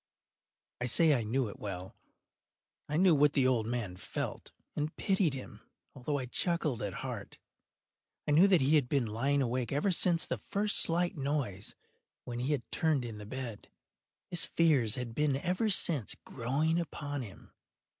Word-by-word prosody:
I 125 - -1
say 155 +5 +5
I 125 - +1
knew 120 +3 0
it 100 - -9
well. 95 -2 -6 0.9
I 150 - 0
knew 185 0 +6
what 145 0 +4
the 135 - +3
old 120 -4 +2
man 115 -6 -3
felt, - - -5 0.2
and 150 +1 -2
pitied 190 -7 +1
him, 130 - -9 0.3
although 145 +3 -2
I 130 - -3
chuckled 155 -1 -1
at - - -2
heart. - - -6 0.9
I - - +1
knew 165 +7 +7
that 185 -6 +4
he 145 +4 +5
had 130 -5 0
been 140 -4 +2
lying 135 +6 +1
awake 125 -1 -1
ever 150 +8 +1
since 175 -1 +2
the - - -3
first 205 +1 0
slight 175 +1 +2
noise, 135 -9 -2 0.5
when 120 -1 -5
he 130 +4 -1
had 140 -5 0
turned 155 -6 +1
in 110 -3 -7
the 105 - -9
bed. 120 -3 -6 0.6
His 175 -1 0
fears 140 -10 +3
had 125 -3 -5
been 145 +2 +1
ever 180 +9 0
since 155 - +2
growing 145 +7 0
upon 145 -4 -4
him. 105 -6 -11
140 Hz, 170 wpm, -32 LUFS, 120-160 Hz, 0.9 s, knew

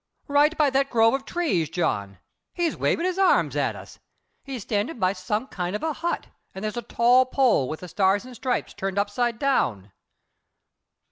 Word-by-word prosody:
"Right 295 +2 +3
by 295 -3 +3
that 275 +1 +1
grove 225 0 +4
of 270 0 -2
trees, 230 - 0
John. 100 - -2 0.4
He's 345 -2 0
waving 335 - 0
his 370 +1 -1
arms 385 - +3
at - - 0
us. - - -12 0.4
He's 265 -6 -6
standing 210 +10 -2
by 185 -3 +1
some 210 +5 -2
kind 180 -5 -4
of 210 - -4
a 320 -1 0
hut 340 +4 -3 0.3
and 190 - -6
there's 215 +1 -3
a 240 - -2
tall 245 +2 +4
pole 255 - +2
with 155 - -5
the 180 - -7
stars 195 +4 +1
and 255 -1 -11
stripes 250 +2 -2
turned 195 0 -4
upside 220 +3 0
down." 115 - 0
235 Hz, 185 wpm, -25 LUFS, 190-275 Hz, 0.4 s, grove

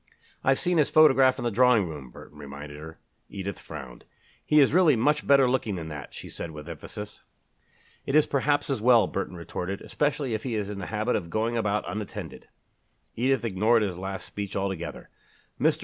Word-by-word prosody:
"I've 135 0 +3
seen 175 -2 +1
his 150 - +3
photograph 135 -4 +6
in - - -5
the 120 - 0
drawing 120 -3 +4
room," 75 -5 -8
Burton 75 +4 -14
reminded 70 +1 -9
her. 80 +1 -10 0.3
Edith 100 -1 -5
frowned. 60 -3 -9 0.4
"He 150 - +4
is 140 -1 +5
really 170 -5 +5
much 150 +6 +1
better 140 -2 +6
looking 125 -5 0
than 80 -3 -6
that," 75 -2 -8
she - - -9
said 85 - -6
with 75 0 -10
emphasis. 95 +6 -8 0.9
"It 135 - 0
is 155 - +6
perhaps 145 +1 0
as 130 - -1
well," 120 -1 +6
Burton 95 -1 -4
retorted, 90 +3 -5
"especially 145 -4 -1
if 110 - -2
he 120 -2 -3
is 105 -1 -2
in 100 - -6
the 95 - -5
habit 110 +5 -1
of 85 -5 -3
going 110 +5 -1
about 105 -2 0
unattended." 105 -1 -6 0.7
Edith 130 +1 +1
ignored 110 +2 +3
his 95 -4 -2
last 95 +1 -5
speech 100 -1 -6
altogether. 95 -3 -4 0.5
"Mr. - - +2
105 Hz, 190 wpm, -27 LUFS, 90-130 Hz, 0.9 s, photograph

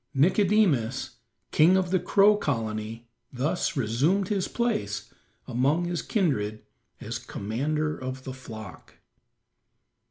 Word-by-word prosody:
Nicodemus, 170 - +2 0.3
king 175 +5 +5
of 185 -2 0
the 185 - +3
Crow 205 +3 +5
Colony, 115 - -3 0.2
thus 140 +6 -1
resumed 140 - +1
his 200 -3 0
place 105 - -2 0.3
among 140 +7 +1
his 175 -1 -2
kindred 110 - -1 0.4
as - - -5
commander 150 +9 -2
of 130 0 -5
the 130 - -6
flock. 110 - -10
140 Hz, 105 wpm, -27 LUFS, 115-180 Hz, 0.4 s, king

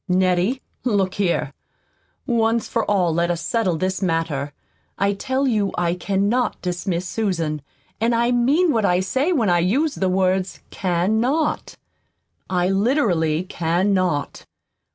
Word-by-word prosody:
"Nettie, 185 +7 +1 0.2
look 200 -6 +1
here. 170 -7 -1 0.7
Once 230 -2 +1
for 230 -2 0
all 180 -5 +2
let 170 +1 +1
us 175 -1 -1
settle 190 -5 0
this 185 +3 -2
matter. 165 -5 -1 0.5
I 200 +1 +1
tell 260 +6 -1
you 210 -5 +1
I 170 -1 +1
cannot 200 +7 0
dismiss 180 0 -3
Susan; 170 -8 -2 0.4
and 230 +1 +2
I 235 +1 +2
mean 280 +8 +3
what 225 -4 +1
I 180 -2 +3
say 260 - 0
when 230 - +2
I 175 - +3
use 270 - +1
the 190 - -1
words 185 0 0
'can 185 +3 0
not.' 295 +5 -1 0.7
I 180 -1 +1
literally 195 - +1
CAN 180 +2 0
NOT. 180 -6 -1
190 Hz, 140 wpm, -21 LUFS, 175-230 Hz, 0.7 s, mean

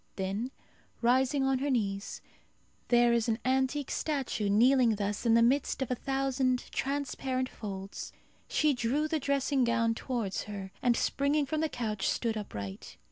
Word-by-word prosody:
Then 195 +6 -2 0.5
rising 260 +3 +3
on 270 -1 +2
her 285 +2 -1
knees 200 -5 -2 0.6
there 240 -1 +4
is 235 0 +1
an 220 - +1
antique 265 +2 +1
statue 270 -9 -1
kneeling 240 +2 +5
thus 205 +3 -2
in 225 - +5
the 230 - +5
midst 270 +2 +2
of 255 - -6
a - - +2
thousand 270 -1 -1
transparent 265 -2 -2
folds 195 -2 -7 0.4
she 305 -1 +2
drew 255 +5 0
the 315 0 0
dressing 275 -1 +1
gown 230 -1 +2
towards 225 -5 -3
her, 200 -2 -7
and 240 -1 +3
springing 285 +1 +1
from 310 +3 -1
the 320 - +1
couch 215 -6 -2
stood 230 -2 -1
upright. 100 - -7
250 Hz, 155 wpm, -30 LUFS, 220-270 Hz, 0.6 s, kneeling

